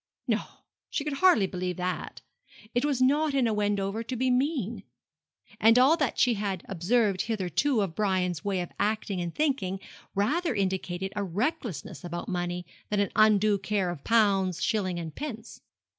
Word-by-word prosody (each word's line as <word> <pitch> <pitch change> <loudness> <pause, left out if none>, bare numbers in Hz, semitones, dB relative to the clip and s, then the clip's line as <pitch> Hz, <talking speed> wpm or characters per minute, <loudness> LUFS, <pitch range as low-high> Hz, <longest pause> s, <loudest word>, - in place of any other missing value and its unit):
No, - - +2 0.5
she 285 - -2
could 300 -1 -3
hardly 315 - +5
believe 180 -1 -3
that. 180 0 -4 0.5
It 245 - +1
was 275 -4 +1
not 290 +2 +2
in 265 -3 +3
a 225 - +1
Wendover 205 0 0
to 240 +3 -4
be 255 +1 +1
mean. 250 - 0 0.8
And 225 +2 +6
all 265 +6 +6
that 290 -8 -1
she 245 - +4
had 200 -4 -3
observed 195 +2 +1
hitherto 215 - 0
of 190 -5 -2
Brian's 185 -3 0
way 195 -3 0
of 175 - -6
acting 205 -3 -1
and 170 -1 -4
thinking 260 -11 0 0.4
rather 285 - +1
indicated 190 -1 -2
a 205 - -1
recklessness 200 - -3
about 175 +4 -5
money 175 -2 -2 0.2
than 210 - 0
an 200 - +1
undue 215 -1 +4
care 190 -2 0
of 160 -5 -8
pounds, 195 -6 +3
shillings, 185 -5 0
and 160 -2 -6
pence. 240 -6 -7
205 Hz, 165 wpm, -28 LUFS, 185-245 Hz, 0.8 s, And